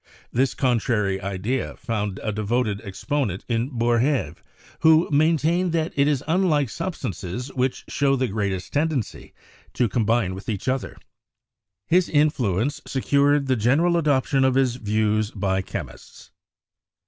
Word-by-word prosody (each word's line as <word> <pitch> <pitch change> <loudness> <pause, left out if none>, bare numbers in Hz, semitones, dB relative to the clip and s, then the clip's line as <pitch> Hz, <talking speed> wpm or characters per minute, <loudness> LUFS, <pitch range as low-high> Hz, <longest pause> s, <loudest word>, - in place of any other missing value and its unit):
This 130 +2 +1
contrary 110 -6 0
idea 100 +7 -3
found 105 -4 -3
a 110 - -1
devoted 110 0 -1
exponent 105 0 -3
in 120 +1 -1
Boerhaave, 120 +2 0 0.4
who 160 +1 +5
maintained 160 +4 +2
that 165 0 -1
it 140 0 +3
is 145 -2 0
unlike 160 - +2
substances 125 - -5
which 130 0 -1
show 140 -1 +1
the 130 -1 0
greatest 100 -3 -3
tend 155 +3 +1
ency 125 -8 -5 0.4
to 125 - +2
combine 110 -3 +1
with 95 +4 -8
each 105 +2 -4
other. 130 0 -2 0.9
His 180 - +2
influence 145 - +1
secured 140 +1 +2
the 130 -1 +1
general 140 +10 +2
adoption 140 -4 +2
of 130 -1 +3
his 130 -2 +2
views 110 -1 0
by 95 -3 -1
chemists. - - -9
125 Hz, 135 wpm, -23 LUFS, 105-145 Hz, 0.9 s, who